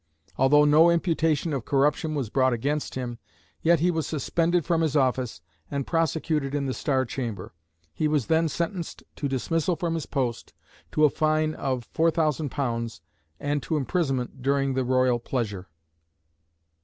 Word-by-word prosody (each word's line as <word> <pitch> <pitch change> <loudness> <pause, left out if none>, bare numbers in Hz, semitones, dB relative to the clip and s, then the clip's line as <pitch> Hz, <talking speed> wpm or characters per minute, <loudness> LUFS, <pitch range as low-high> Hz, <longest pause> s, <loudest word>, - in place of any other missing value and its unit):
Although 145 +3 +5
no 155 +3 +6
imputation 165 -2 +1
of 135 -4 -2
corruption 150 +4 +1
was 130 -7 -3
brought 130 -1 +3
against 145 +6 -2
him, 120 -2 -4 0.4
yet 170 -1 +3
he 180 +1 +3
was 160 -4 -2
suspended 165 +3 0
from 165 -1 +1
his 155 -3 0
office, 130 - +1 0.3
and 140 -1 -2
prosecuted 160 -3 0
in 140 -1 -1
the 130 - -1
Star 130 -1 0
Chamber. 115 -8 -5 0.4
He 155 - 0
was 150 -5 +1
then 160 0 +2
sentenced 170 +2 -4
to 145 - -1
dismissal 165 +6 0
from 165 +1 -2
his 165 -2 -3
post, 125 -5 -2 0.4
to 155 - +5
a - - +5
fine 155 0 +1
of 130 -5 -3
£4000, 140 - 0 0.4
and 145 0 -1
to 160 - -1
imprisonment 135 -4 -1
during 135 0 +1
the 130 0 0
Royal 130 -1 +2
pleasure." 110 -6 -3
145 Hz, 155 wpm, -26 LUFS, 130-160 Hz, 0.4 s, no